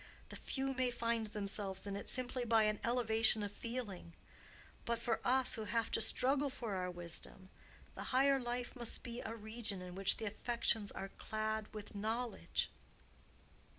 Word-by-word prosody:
The - - -7
few 270 0 -2
may 255 -1 +1
find 230 -2 0
themselves 200 -2 0
in 200 -1 -3
it 200 - -5
simply 255 -1 -1
by 225 -2 +4
an 215 -1 +1
elevation 225 -2 +4
of 205 - -3
feeling; 205 -7 -5 0.7
but 235 0 0
for 230 -1 0
us 260 +1 +4
who 220 - -2
have 225 +2 0
to - - +3
struggle 275 +5 +3
for 240 -6 -4
our 180 -1 -1
wisdom, 175 +2 -3 0.4
the - - -6
higher 275 +1 +4
life 245 0 -3
must 240 -2 +1
be 235 0 -5
a 225 - -4
region 220 -2 -3
in 180 0 -7
which 195 +1 +4
the 220 - -4
affections 220 0 0
are 195 - -5
clad 215 0 -2
with 210 -1 -8
knowledge." 225 +4 -2
225 Hz, 165 wpm, -37 LUFS, 205-245 Hz, 0.7 s, by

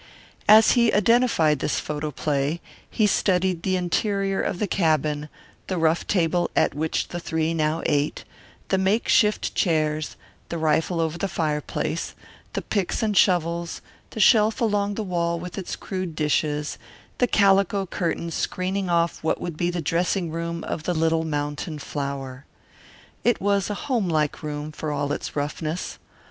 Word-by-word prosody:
As 220 +1 +8
he 235 -2 +4
identified 210 - +3
this - - 0
photo 150 0 -3
play 145 +2 -1 0.3
he 215 - +2
studied 185 -3 +2
the 185 +1 0
interior 195 +2 0
of - - -2
the 210 - 0
cabin, 155 -5 0 0.4
the 185 - -2
rough 165 0 +1
table 175 -2 +1
at - - +3
which 155 +3 -1
the 175 - -4
three 160 -1 -1
now 155 0 0
ate, 145 +1 0 0.5
the 190 - +2
makeshift 210 +2 +2
chairs, 155 -3 0 0.3
the 170 - -3
rifle 160 +2 +1
over 165 +1 -1
the 195 - 0
fireplace, 155 -4 -2 0.4
the - - -3
picks 200 +1 -1
and 210 -2 0
shovels, 170 -3 +2 0.3
the - - -7
shelf 220 +2 +5
along 205 -3 +1
the 220 - -2
wall 170 -3 -1
with 180 +1 -7
its 190 -3 -4
crude 185 -4 -5
dishes, 150 -1 0 0.4
the 245 - +4
calico 195 -2 +3
curtain 170 -2 -2
screening 185 +3 -2
off 170 -1 +1
what 160 - 0
would 170 -3 -4
be 175 +2 0
the 175 -1 -2
dressing 170 +2 0
room 170 0 -4
of - - -3
the 175 +3 -2
little 160 0 +2
mountain 150 +1 -3
flower. 140 -2 -5 0.8
It 240 - +2
was 200 0 +1
a 205 - -2
home 240 -10 0
like 155 -2 0
room, 150 0 -4
for 155 0 -4
all 145 0 -1
its - - -4
roughness. 155 +3 -3
170 Hz, 155 wpm, -24 LUFS, 155-195 Hz, 0.8 s, As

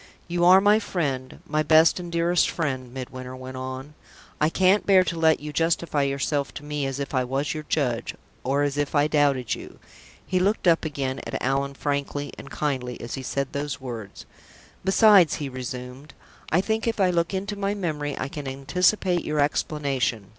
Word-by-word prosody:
"You 175 0 -1
are 185 +2 +8
my 205 +2 +5
friend 140 -11 -3
my 155 +1 0
best 160 +3 +5
and 175 -1 -7
dearest 170 +1 +2
friend," 130 -6 -3
Midwinter 130 0 -7
went 130 0 -8
on. 130 +3 -6 0.5
"I 150 - +3
can't 190 +4 +3
bear 190 -2 +6
to 170 -2 -3
let 160 -1 +4
you 150 0 -7
justify 165 -2 +1
yourself 140 +1 -1
to - - -7
me 150 -2 -2
as 135 0 -4
if 140 0 -4
I 130 -1 +2
was 135 +3 -1
your 155 -1 -6
judge, 125 -7 -1 0.3
or 140 +3 +1
as 145 0 -1
if 145 +1 -1
I 145 0 +4
doubted 140 -5 +2
you." - - -8 0.5
He 185 - 0
looked 195 +1 +1
up 170 -1 +4
again 140 -3 -3
at - - -3
Allan 140 +1 -1
frankly 145 0 -3
and 140 - -10
kindly 130 -5 -3
as 120 - -7
he 135 - -4
said 140 +1 -2
those 145 0 -3
words. 115 -6 -8 0.6
"Besides," 195 -2 +6
he 145 -2 -4
resumed, 125 +2 -7 0.4
"I 175 - +4
think, 220 +3 -1
if 225 -1 -1
I 185 -2 +4
look 170 -1 0
into 200 +2 -3
my 200 0 -1
memory, 150 -7 -3
I 130 - -2
can 145 0 -7
anticipate 175 +7 +1
your 150 0 -2
explanation. 140 -7 0
145 Hz, 190 wpm, -25 LUFS, 135-170 Hz, 0.6 s, are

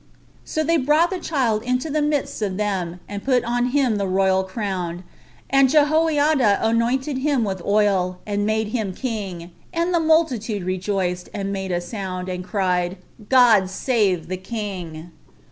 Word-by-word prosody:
So 315 - -2
they 330 +2 +2
brought 305 +5 +3
the 375 - -2
child 245 -11 0
into 250 +4 -1
the 305 +1 +1
midst 295 -5 -1
of 195 -3 -2
them, 185 -4 -2
and 205 -1 -6
put 255 -2 +2
on 245 +1 0
him 255 -4 +1
the 200 -1 -1
royal 190 0 +2
crown, 185 -3 -4 0.4
and 275 -1 +4
Jehoiada 300 -5 +3
anointed 250 +5 0
him 275 -3 +1
with 190 -3 -2
the - - -11
oil, 195 -3 +2
and 205 -1 -1
made 215 0 0
him 215 -5 -2
king; 195 -9 -5 0.2
and 340 +1 0
the 340 - +3
multitude 260 - +1
rejoiced, 185 -1 -2
and 200 -1 -3
made 190 -1 -3
a - - +1
noise, 175 +5 -5 0.3
and 180 -1 -4
cried, 180 -2 -1 0.3
"God 230 -7 +5
save 190 -5 0
the 185 +1 -3
king!" 185 -5 -6
210 Hz, 160 wpm, -22 LUFS, 185-265 Hz, 0.4 s, God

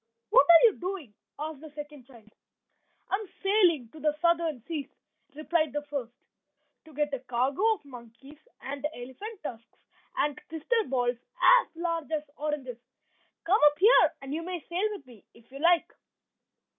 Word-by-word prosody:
"What 280 - +6
are 335 -1 +9
you 455 -4 +5
doing?" 355 - -5 0.2
asked 305 0 -5
the 315 - -10
second 295 -4 -9
child. 225 -5 -18 0.8
"I 390 - +3
am 420 -3 -9
sailing 360 - +3
to 310 - -13
the 300 0 0
Southern 335 -7 +1
Seas," 310 -4 -4 0.5
replied 310 -1 0
the 295 0 -2
first, 275 -5 -5 0.7
"to 315 - -16
get 295 -1 -1
a 275 - -1
cargo 255 - -1
of 365 - -20
monkeys, 255 +3 -13 0.2
and 280 +1 -6
elephant 335 - -9
tusks, 230 -5 -9 0.3
and 295 -2 0
crystal 425 +8 0
balls 245 -2 0 0.2
as - - +6
large 335 -2 -3
as 310 -2 -1
oranges. 285 -5 -4 0.6
Come 385 +5 +3
up 295 - -16
here, 420 +8 +6
and 270 +1 -6
you 320 - -2
may 350 -1 -6
sail 370 +5 0
with 405 -9 -8
me 240 -5 -17
if 230 +2 -21
you 275 - -9
like." 340 +2 +3
300 Hz, 165 wpm, -28 LUFS, 265-340 Hz, 0.8 s, are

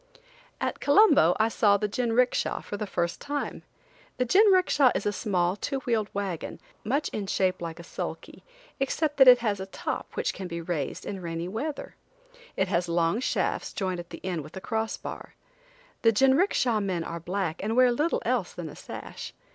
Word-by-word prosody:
At - - -2
Colombo 285 - +5
I 220 - +4
saw 205 -2 +3
the 210 - -1
jinricksha 245 +3 +1
for - - -5
the 210 0 -4
first 175 -2 -2
time. 290 0 -3 0.6
The 250 - +1
jinricksha 370 - +5
is - - -2
a 205 - +1
small 185 -4 0
two 275 +6 -3
wheel 225 -5 0
wagon, 195 -5 -4 0.2
much 275 +7 0
in 205 -2 -4
shape 185 -1 0
like 165 0 -5
a - - -8
sulky, - - -7 0.4
except 295 +2 0
that 265 -2 +7
it 250 -1 +10
has 205 -2 0
a 190 - -5
top - - -5
which - - -1
can 190 - -6
be 170 -1 -5
raised 165 -4 -3
in 195 -2 -5
rainy 165 0 -4
weather. 275 +10 -4 0.6
It 190 - +2
has 175 -1 0
long 170 +4 +1
shafts 260 - -1
joined 185 -3 -2
at 175 0 -8
the - - -10
end 180 -4 -2
with 155 +6 -11
a - - -6
crossbar. 220 +1 -4 0.7
The 225 - +5
jinricksha 265 - +3
men 180 -4 -1
are 170 +1 -5
black 175 0 -3
and 220 +3 -1
wear 250 0 +6
little 300 +7 0
else 235 -6 0
than 175 -3 -5
a 150 - -11
sash. - - -8
205 Hz, 185 wpm, -27 LUFS, 175-250 Hz, 0.7 s, it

